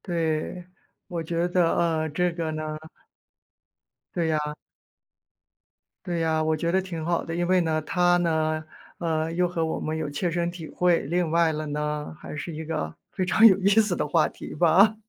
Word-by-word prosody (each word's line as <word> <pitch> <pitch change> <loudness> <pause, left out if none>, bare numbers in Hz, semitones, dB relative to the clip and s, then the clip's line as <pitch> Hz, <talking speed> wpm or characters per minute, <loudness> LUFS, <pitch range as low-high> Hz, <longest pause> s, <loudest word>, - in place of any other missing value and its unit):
对， 170 0 -2 0.4
我 170 -2 -4
觉 170 +1 -1
得， 165 -2 +1
这 180 +4 0
个 165 -2 -3
呢 155 0 -4 1.4
对 170 -2 0
呀。 150 -1 -1 1.5
对 175 -1 -2
呀， 160 -1 +1
我 155 0 +1
觉 170 +2 -1
得 190 +2 +2
挺 175 -4 -6
好 170 0 0
的。 165 - -5
因 175 0 0
为 185 0 +4
呢 160 -2 0
它 175 +1 +3
呢， 155 -2 0 0.3
呃， 160 -1 -1
又 180 +1 +2
和 170 -2 -2
我 160 - -2
们 155 - -3
有 155 -2 -3
切 165 +5 -2
身 170 0 0
体 170 -2 -8
会。 180 -2 +2
另 170 +4 0
外 165 0 +3
了 155 0 -4
呢， 150 +1 -3
还 - - -8
是 150 +3 -5
一 160 +1 -6
个 150 - -3 0.2
非 185 - -2
常 205 +5 +4
有 205 -4 +9
意 195 +1 +3
思 210 -3 +3
的 - - -1
话 155 +1 +3
题 - - -9
吧。 180 +7 +5
165 Hz, 195 characters per minute, -26 LUFS, 155-175 Hz, 1.5 s, 有